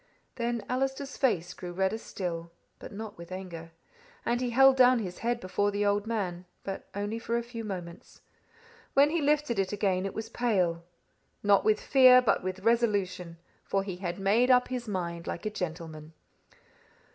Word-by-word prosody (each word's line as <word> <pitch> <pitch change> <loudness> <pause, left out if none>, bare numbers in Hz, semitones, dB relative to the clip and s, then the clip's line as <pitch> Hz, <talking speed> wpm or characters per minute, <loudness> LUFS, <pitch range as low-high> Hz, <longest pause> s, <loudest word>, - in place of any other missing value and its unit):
"Then 235 -2 -2
Allister's 270 +2 -2
face 185 -11 0
grew 175 -1 -7
redder 190 +4 0
still, 170 -5 -5 0.3
but - - -9
not 210 -2 -8
with 170 +1 -10
anger, 170 -3 -7 0.5
and 240 +1 0
he 250 - 0
held 270 +2 +6
down 255 -1 +6
his 185 -6 -5
head 235 +1 -1
before 205 +1 0
the 205 0 -1
old 205 +1 +1
man, 185 -6 -3 0.2
but 195 -1 -6
only 205 +3 -3
for 230 +1 -1
a 235 - -2
few 230 -1 -7
moments. 180 -5 -8 0.7
When 285 +2 +5
he 335 -1 0
lifted 290 -6 +1
it 190 -1 0
again, 195 -2 0
it 195 - -8
was 220 0 -4
pale, 190 -8 0 0.6
not 200 -1 +4
with 215 -1 +3
fear 255 -2 +7
but 250 - +2
with 185 0 -4
resolution, 200 -7 0 0.3
for 195 0 0
he 190 -3 -5
had 180 -2 -4
made 210 +6 +3
up 250 -1 +5
his 250 -2 -4
mind 170 -4 -4
like - - -5
a 215 - -1
gentleman. 160 -4 -6
205 Hz, 175 wpm, -29 LUFS, 185-240 Hz, 0.7 s, fear